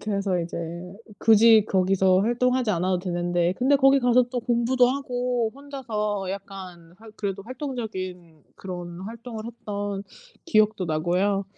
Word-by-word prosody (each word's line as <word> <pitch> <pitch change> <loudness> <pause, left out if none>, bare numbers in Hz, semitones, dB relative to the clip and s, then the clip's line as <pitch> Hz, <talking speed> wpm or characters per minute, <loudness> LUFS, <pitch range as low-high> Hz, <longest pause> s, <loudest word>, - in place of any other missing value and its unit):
그래서 200 -3 -1
이제 170 - -5
음 170 +3 -6 0.2
굳이 220 -1 +6
거기서 190 -1 +3
활동하지 245 +1 +1
않아도 180 0 0
되는데 175 -1 0
근데 275 +3 +4
거기 270 0 +5
가서 245 0 +4
또 245 -1 -2
공부도 245 +1 +2
하고 250 -3 -1
혼자서 215 -9 -4
약간 190 -4 -9
활 225 0 -13
그래도 195 -2 -4
활동적인 190 - -6
그런 175 -2 -7
활동을 225 +1 -7
했던 205 -4 -5 0.4
기억도 215 - +2
나고요. 180 +5 0
205 Hz, 305 characters per minute, -25 LUFS, 185-240 Hz, 0.4 s, 굳이